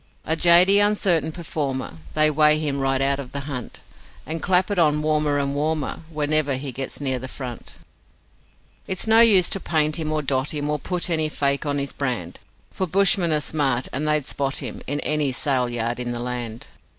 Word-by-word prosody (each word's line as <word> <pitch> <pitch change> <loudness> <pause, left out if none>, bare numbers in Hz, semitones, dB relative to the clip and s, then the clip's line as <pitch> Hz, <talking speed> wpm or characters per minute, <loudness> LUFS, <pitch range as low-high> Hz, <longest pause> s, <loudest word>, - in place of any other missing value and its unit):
A 160 - +1
jady, 175 +4 +6
uncertain 195 -7 +1
performer, 145 - -4 0.2
They 155 0 +4
weight 150 0 +4
him 145 -3 -2
right 135 -1 0
out 140 0 +1
of 130 -3 -9
the 140 - -4
hunt, 135 -4 -7 0.4
And 160 +1 -4
clap 185 +1 +2
it 200 - 0
on 150 -2 +2
warmer 150 -1 +1
and 140 -1 -1
warmer 155 +2 -2
Whenever 150 -2 0
he 135 +1 -5
gets 135 +1 -6
near 130 -3 -1
the 130 - -7
front. 125 -3 -8 1.1
'It's 190 -1 -3
no 220 0 +5
use 205 -6 +7
to 195 - +1
paint 155 -3 +1
him 155 -1 -2
or 155 -1 -1
dot 135 +2 -1
him 145 0 -2
Or 150 - -2
put 180 +3 -2
any 155 -2 0
'fake' 140 0 -1
on 145 0 0
his 140 0 -3
brand, 120 -11 -4 0.3
For 185 - -3
bushmen 185 -1 +4
are 150 -1 +1
smart, 135 -5 -1
and 150 +4 -2
they'd 150 -2 +1
spot 140 -1 -2
him - - -6
In 145 +2 -2
any 150 -2 0
sale 130 -1 +1
yard 120 0 -3
in 120 -1 -3
the 120 - -5
land. 120 -2 -5
150 Hz, 200 wpm, -22 LUFS, 135-160 Hz, 1.1 s, use